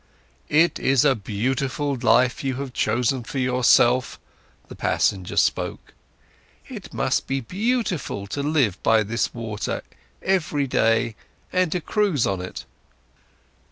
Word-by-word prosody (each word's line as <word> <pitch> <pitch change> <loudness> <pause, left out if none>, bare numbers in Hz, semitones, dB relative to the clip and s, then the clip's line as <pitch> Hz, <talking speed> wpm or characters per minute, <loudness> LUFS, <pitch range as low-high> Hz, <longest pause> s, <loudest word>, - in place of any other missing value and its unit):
"It's 150 -5 +3
a 145 -2 +5
beautiful 130 +6 -2
life 125 +1 +2
you 135 -1 -1
have 135 -1 -5
chosen 120 +3 0
for 135 - -7
yourself," 125 -1 +3 0.5
the - - -10
passenger 95 -3 0
spoke. - - 0 0.7
"It - - -9
must - - -1
be 135 0 -1
beautiful 185 - -2
to 120 +8 -4
live 140 - +1
by 110 -1 +4
this 115 +3 -1
water 110 -3 -4 0.4
every 155 -7 +1
day 115 -3 +1 0.4
and 185 -3 +2
to 180 - -1
cruise 195 - +1
on 95 -2 -1
it." 90 - -7
130 Hz, 120 wpm, -23 LUFS, 115-145 Hz, 0.7 s, a